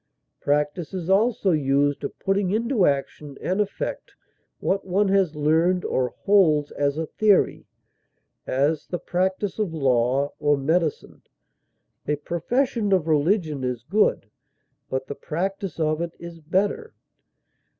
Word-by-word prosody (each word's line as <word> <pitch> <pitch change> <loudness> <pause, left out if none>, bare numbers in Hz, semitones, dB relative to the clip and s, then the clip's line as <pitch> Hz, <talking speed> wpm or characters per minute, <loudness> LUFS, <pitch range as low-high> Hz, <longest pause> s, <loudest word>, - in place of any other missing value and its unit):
Practise 150 +5 -1
is 185 0 -2
also 205 -1 +3
used 145 -2 +1
of - - -5
putting 195 -1 0
into 225 0 +2
action 140 0 -2
and 190 +3 0
effect 210 - -4 0.4
what 195 +1 0
one 195 +2 +1
has 190 -5 +2
learned 160 +5 +2
or 125 -2 -1
holds 160 -8 +4
as 145 0 -1
a 160 - -1
theory; 205 +4 +2 0.8
as, 145 +4 0
the 175 - -3
practise 185 +3 -2
of 190 -6 -1
law 135 0 +1
or 145 -1 +2
medicine; 160 +3 -1 0.9
a 150 - +1
profession 210 - -1
of 180 -4 +2
religion 155 -2 +1
is 125 -3 -3
good, 195 - +1 0.6
but 130 0 -2
the 140 - -5
practise 190 +5 -4
of 155 0 0
it 170 -1 -4
is 170 -1 -10
better. 200 - -1
170 Hz, 130 wpm, -24 LUFS, 145-195 Hz, 0.9 s, holds